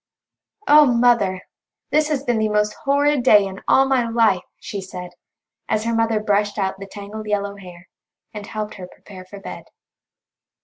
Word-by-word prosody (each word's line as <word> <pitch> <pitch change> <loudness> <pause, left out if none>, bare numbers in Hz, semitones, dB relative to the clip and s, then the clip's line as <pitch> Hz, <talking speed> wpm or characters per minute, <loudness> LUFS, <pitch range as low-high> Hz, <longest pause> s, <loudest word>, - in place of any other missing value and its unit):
"Oh, 300 -2 +7
Mother! 235 -6 +2 0.5
This 305 0 +2
has 285 -3 -1
been 240 -4 0
the 215 0 +1
most 210 0 +1
horrid 285 0 +2
day 210 -5 +5
in 195 0 -8
all 270 - +5
my 255 -3 +1
life," 225 -5 +2 0.2
she 200 - -6
said, 180 -1 -8 0.6
as 215 - 0
her 230 0 -1
mother 225 -1 +1
brushed 205 0 0
out 195 -1 -2
the 195 - -8
tangled 205 +2 -9
yellow 200 -1 -2
hair, 180 -2 -13 0.5
and 210 -1 -8
helped 215 -1 -5
her 185 -2 -9
prepare 185 0 -14
for 200 +2 -11
bed. 195 - -9
210 Hz, 170 wpm, -21 LUFS, 195-235 Hz, 0.6 s, Oh